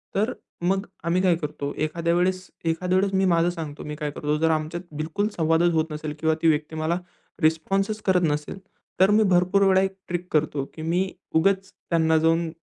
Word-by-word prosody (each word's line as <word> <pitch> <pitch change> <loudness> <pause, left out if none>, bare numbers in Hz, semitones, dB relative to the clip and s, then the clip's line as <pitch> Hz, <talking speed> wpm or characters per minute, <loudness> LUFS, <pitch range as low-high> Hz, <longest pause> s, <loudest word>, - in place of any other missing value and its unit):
तर 215 +6 +1 0.3
मग 195 +3 +1 0.2
आम्ही 175 +2 +2
काय 180 -3 +4
करतो, 145 -2 -4
एखाद्या 170 +2 0
वेळेस 185 +1 0 0.2
एखाद्या 180 +3 +1
वेळेस 195 +1 +1
मी 190 0 +3
माझं 170 -1 +3
सांगतो 160 -4 -6
मी 150 - -5
काय 150 -1 -3
करतो, 150 +1 -1
जर 160 +1 +2
आमच्यात 160 +3 -2
बिलकुल 160 +7 -1
संवादच 165 +1 +3
होत 160 0 0
नसेल 150 0 -4
किंवा 160 0 +2
ती 165 - +3
व्यक्ती 155 0 +1
मला 160 +2 0 0.4
रिस्पॉन्सच 195 +7 +1
करत 185 -2 +3
नसेल, 150 +4 -2 0.4
तर 190 +2 +5
मी 215 +1 +5
भरपूर 180 +3 +3
वेळा 190 0 +5
एक 195 0 -1
ट्रिक 175 0 -3
करतो 150 -2 +1
की 160 - -9
मी 175 +4 0 0.3
उगाच 195 +3 +2
त्यांना 160 -1 +1
जाऊन 165 +1 +2
170 Hz, 190 wpm, -24 LUFS, 155-185 Hz, 0.4 s, तर